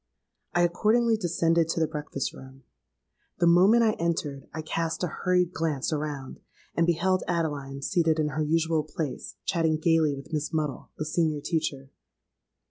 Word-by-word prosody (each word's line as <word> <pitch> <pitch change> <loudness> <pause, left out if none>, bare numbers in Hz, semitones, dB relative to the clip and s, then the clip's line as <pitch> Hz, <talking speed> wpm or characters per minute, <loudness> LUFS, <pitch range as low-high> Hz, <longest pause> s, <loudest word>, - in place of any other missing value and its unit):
"I 175 - +4
accordingly 225 +7 +3
descended 165 -4 +1
to 165 - 0
the 160 - +3
breakfast 150 -3 -4
room. 130 0 -13 0.7
The 175 - +2
moment 190 +7 +6
I 220 - +4
entered, 145 -5 -2
I 155 +1 -5
cast 165 +2 -2
a - - +2
hurried 180 -1 +2
glance 155 -3 -1
around, 145 -3 -4 0.3
and 165 0 +2
beheld 185 +2 +2
Adeline 145 -5 -2
seated 165 +1 +2
in 155 -1 +1
her 150 +2 -2
usual 160 +1 +1
place, 155 -2 -5
chatting 160 -3 +1
gaily 160 -2 +2
with 140 +3 -10
Miss 150 0 -1
Muddle, 155 -4 -2
the 155 - -3
senior 155 -1 0
teacher. 140 -3 -2
160 Hz, 155 wpm, -27 LUFS, 150-170 Hz, 0.7 s, moment